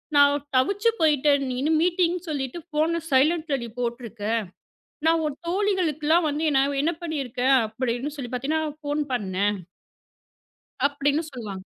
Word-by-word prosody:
நான் 285 0 +5
தவிச்சுப் 405 - +2
போயிட்டேன், 290 -2 +3
நீ 250 - -2
இன்னும் 310 +2 +2
மீட்டிங் 355 0 +2
சொல்லிட்டு 275 +1 -3
ஃபோன் 315 +2 +1 0.2
சைலன்ட்ல 300 +2 +3
நீ - - -5
போட்டுருக்க. 235 -3 -4 0.8
நான் 325 0 +3
உன் 290 -2 -4
தோழிகளுக்கெல்லாம் 345 -5 +1
வந்து, 310 +2 -1
நான் 275 0 +1
என்ன 335 +2 +1
பண்ணி 315 -3 -3
இருக்கேன்? 255 +2 +1
அப்படின்னு 245 +5 -3
சொல்லிப் 250 -1 -5
பாத்தீனா, 300 +5 -1 0.2
ஃபோன் 295 0 -1
பண்ணேன் 205 -2 0 1.3
அப்பிடின்னு 285 +2 0
சொல்லுவாங்க. 205 -7 -7
290 Hz, 130 wpm, -25 LUFS, 255-320 Hz, 1.3 s, நான்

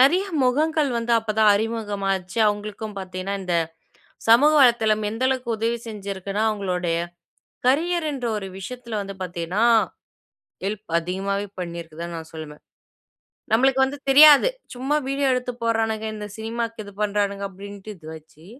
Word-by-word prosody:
நிறைய 350 +9 +5 0.2
முகங்கள் 300 +4 +2
வந்து 235 0 -1
அப்ப 225 -1 -4
தான் 215 -1 +6
அறிமுகமாச்சு. 205 -3 -2
அவங்களுக்கும் 210 0 -3
பார்த்தீங்கன்னா 185 +1 -4
இந்த 180 -2 0 0.7
சமூக 265 +7 +7
வலைத்தளம் 220 -4 +4
எந்த 225 +4 -5
அளவுக்கு 255 -2 -1
உதவி 230 +2 0
செஞ்சிருக்குனா, 200 -1 -4
அவங்களுடைய 180 -5 -1 0.7
கரியர்ன்ற 305 -2 +1
ஒரு 195 - -6
விஷயத்துல 235 +2 -6
வந்து 195 0 -6
பார்த்தீங்கன்னா, 180 +4 -1 1.0
ஹெல்ப் 205 +1 -4
அதிகமாவே 195 +4 -2
பண்ணிருக்கதான் 170 -1 -6
நான் 160 0 -9
சொல்லுவேன். 155 -2 -9 0.9
நம்மளுக்கு 265 +3 +4
வந்து 275 +2 -5
தெரியாது. 295 - +8 0.3
சும்மா 265 +4 -1
வீடியோ 275 0 +1
எடுத்து 250 0 -2
போட்றானுங்க, 225 -1 0
இந்த 210 -1 -6
சினிமாக்கு 230 0 -4
இது 200 - -10
பண்றானுங்க 200 -1 -1
அப்டின்ட்டு 200 +2 -9
இது 160 -2 -14
வச்சி 155 0 -16
215 Hz, 130 wpm, -23 LUFS, 195-245 Hz, 1.0 s, தெரியாது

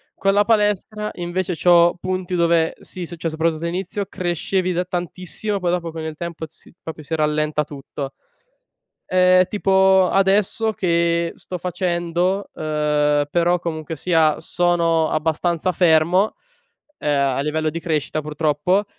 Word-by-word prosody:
Con 195 0 +1
la 205 +1 +4
palestra 210 -1 0
invece, 175 +1 -2
c'ho 175 0 +5
punti 185 0 -2
dove, 170 -1 +2
sì 180 -2 -7
successo 165 -2 -5
soprattutto 160 0 -1
all'inizio 185 +4 -3
crescevi 180 +1 -1
da 180 +1 0
tantissimo, 185 +3 -4
poi 175 -1 0
dopo, 170 -2 -2
con 160 0 -6
il 160 -1 -5
tempo 170 -2 -5
si 160 - -17
proprio 160 -1 -8
si 160 +3 -3
rallenta 150 0 0
tutto. 140 -1 -7 0.9
Ehm, 185 0 +4
tipo 190 -2 +3
adesso 200 +3 +2
che 170 -2 +1
sto 180 - -7
facendo 180 +2 -1
uhm, 150 -1 +1
però 175 0 +2
comunque 160 -1 -5
sia 160 -1 +2
sono 165 -1 +1
abbastanza 165 +3 0
fermo, 175 +4 +3 0.7
ehm, 145 -1 0 0.2
a - - 0
livello 155 +2 -1
di 165 +2 -5
crescita 155 -1 -2
purtroppo, 155 +6 0
170 Hz, 135 wpm, -21 LUFS, 160-185 Hz, 0.9 s, c'ho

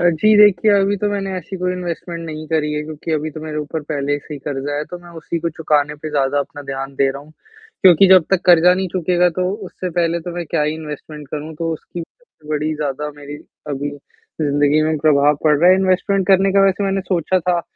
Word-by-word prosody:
अ, - - -1
जी, 210 +7 +3
देखिए, 205 -1 +5
अभी 200 0 +2
तो 205 +2 -1
मैंने 195 -1 -3
ऐसी 185 +1 -6
कोई 180 0 -1
इन्वेस्टमेंट 175 -1 -5
नहीं 155 -1 -7
करी 155 -2 0
है, 150 0 -2
क्योंकि 155 +1 -7
अभी 155 0 -1
तो 155 +1 -9
मेरे 155 -1 -6
ऊपर 150 +1 -4
पहले 145 -1 -1
से 150 +1 -9
ही - - -7
कर्ज़ा 145 0 -3
है 150 - -2
तो 180 - -6
मैं 175 0 -15
उसी 165 +1 -4
को 170 +1 -2
चुकाने 150 -2 +1
पर 155 +1 -7
ज़्यादा 140 -1 +1
अपना 145 +1 -5
ध्यान 135 0 -5
दे 135 - +3
रहा 140 +1 -8
हूँ। 150 +2 -18 0.5
क्योंकि 185 0 +7
जब 185 -3 +7
तक 195 -2 +3
कर्ज़ा 175 0 +6
नहीं 190 +1 -2
चुकेगा 180 0 +1
तो 180 0 +1 0.2
उससे 185 0 -6
पहले 170 0 0
तो 175 - -6
मैं 175 0 -4
क्या - - +1
ही 150 +1 0
इन्वेस्टमेंट 150 -1 -8
करूँ, 155 +2 -6
तो 165 +1 -2
उसकी 170 +2 -7 0.5
बड़ी 155 0 -1
ज़्यादा 150 0 -3
मेरी 145 0 -9 0.3
अभी 145 0 -3 0.5
ज़िंदगी 145 0 +2
में 155 - +1
भी 155 - -1
प्रभाव 145 -1 +4
पड़ 150 -1 +5
रहा 175 +4 +6
है, 185 - +6
इन्वेस्टमेंट 190 0 +1
करने 195 0 +4
का 195 - +4
वैसे 195 +1 +1
मैंने 195 0 0
सोचा 185 0 +1
था, 175 0 0
160 Hz, 235 wpm, -19 LUFS, 150-180 Hz, 0.5 s, क्योंकि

